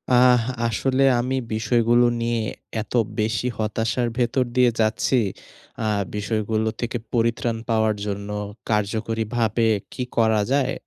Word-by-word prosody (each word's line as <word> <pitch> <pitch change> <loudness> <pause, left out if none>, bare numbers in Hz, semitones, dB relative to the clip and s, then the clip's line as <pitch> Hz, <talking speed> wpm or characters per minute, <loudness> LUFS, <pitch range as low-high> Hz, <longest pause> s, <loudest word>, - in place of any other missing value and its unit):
আহ 125 -1 +6 0.2
আসলে 130 +4 +1 0.2
আমি 130 +2 -1 0.2
বিষয়গুলো 120 +1 +3 0.2
নিয়ে 115 -1 0 0.4
এত 105 - -9 0.3
বেশি 110 +2 0
হতাশার 110 +2 -1
ভেতর 125 +1 +1
দিয়ে 125 -1 +5
যাচ্ছি। 110 +4 +2 0.7
আ - - +1 0.3
বিষয়গুলো 110 +1 -1
থেকে 120 0 -2 0.2
পরিত্রাণ 115 0 +1
পাওয়ার 110 -1 +2
জন্য 100 0 -4 0.4
কার্যকরীভাবে 110 +2 0 0.3
কি 125 - -3
করা 110 -2 +3
যায়? 135 -1 +2
115 Hz, 115 wpm, -23 LUFS, 110-120 Hz, 0.7 s, আহ